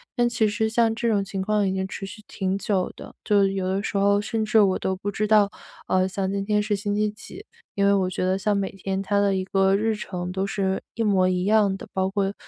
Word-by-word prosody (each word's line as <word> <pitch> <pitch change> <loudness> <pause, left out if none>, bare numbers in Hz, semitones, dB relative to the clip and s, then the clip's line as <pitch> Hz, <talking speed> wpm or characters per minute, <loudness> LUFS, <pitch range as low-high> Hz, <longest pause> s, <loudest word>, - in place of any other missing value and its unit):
但 240 -2 +3
其 230 -2 +1
实 220 +2 0
像 225 0 +2
这 235 - -1
种 205 -3 +2
情 195 0 -5
况 205 +1 +1
已 - - 0
经 190 0 -2
持 195 - -7
续 215 +2 -11
挺 190 0 -2
久 195 -2 -1
的， - - -11
就 205 -1 +3
有 195 -1 -1
的 195 +2 -1
时 - - -4
候 200 +1 +3
甚 220 +2 -2
至 220 +1 +3
我 195 -2 +3
都 190 - -1
不 200 +2 -4
知 210 +1 -1
道， 210 -2 +4 0.4
呃， 185 0 +2
像 190 0 -2
今 200 0 -2
天 210 0 +2
是 210 0 0
星 205 0 -2
期 210 0 +1
几。 295 - -11 0.3
因 200 0 +2
为 200 - +5
我 190 -2 +1
觉 185 - -2
得 190 +1 +1
像 205 0 +1
每 195 -1 -2
天 195 0 -4
它 200 +1 +1
的 200 -1 +2
一 185 - -1
个 195 0 +2
日 220 +2 +1
程 180 -3 -5
都 190 +1 -2
是 195 -1 -1
一 225 - -1
模 190 -3 +3
一 180 -1 0
样 205 -1 +3
的， - - -9
包 190 0 0
括 195 0 -1
200 Hz, 280 characters per minute, -24 LUFS, 190-210 Hz, 0.4 s, 为